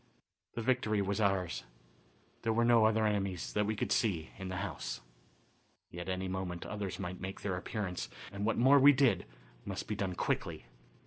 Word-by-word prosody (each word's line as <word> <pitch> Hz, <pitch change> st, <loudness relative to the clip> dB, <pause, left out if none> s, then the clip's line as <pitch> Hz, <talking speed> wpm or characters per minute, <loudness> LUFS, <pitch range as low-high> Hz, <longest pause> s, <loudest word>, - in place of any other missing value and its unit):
The 115 Hz, -, -2 dB
victory 115 Hz, -4 st, +2 dB
was 100 Hz, +2 st, 0 dB
ours. 95 Hz, -4 st, +1 dB, 0.8 s
There 115 Hz, -1 st, +1 dB
were 115 Hz, +1 st, +3 dB
no 115 Hz, -2 st, +6 dB
other 110 Hz, 0 st, +3 dB
enemies, 100 Hz, -4 st, -1 dB
that 105 Hz, -1 st, +1 dB
we 110 Hz, -, 0 dB
could -, -, -2 dB
see, 95 Hz, -10 st, +1 dB
in 95 Hz, -, -5 dB
the 95 Hz, -, -3 dB
house. -, -, -5 dB, 0.9 s
Yet 85 Hz, +2 st, -6 dB
at -, -, +1 dB
any 95 Hz, +1 st, -3 dB
moment 95 Hz, -2 st, -3 dB
others 105 Hz, -3 st, -4 dB
might 90 Hz, -1 st, -5 dB
make 95 Hz, +1 st, -5 dB
their 95 Hz, -3 st, -1 dB
appearance, 90 Hz, 0 st, -3 dB, 0.2 s
and 100 Hz, +1 st, -4 dB
what 115 Hz, -, +1 dB
more 135 Hz, +4 st, +7 dB
we 145 Hz, +2 st, +8 dB
did 135 Hz, -, +3 dB, 0.4 s
must -, -, -5 dB
be -, -, -1 dB
done 95 Hz, -3 st, -2 dB
quickly. -, -, -2 dB
100 Hz, 185 wpm, -33 LUFS, 95-110 Hz, 0.9 s, we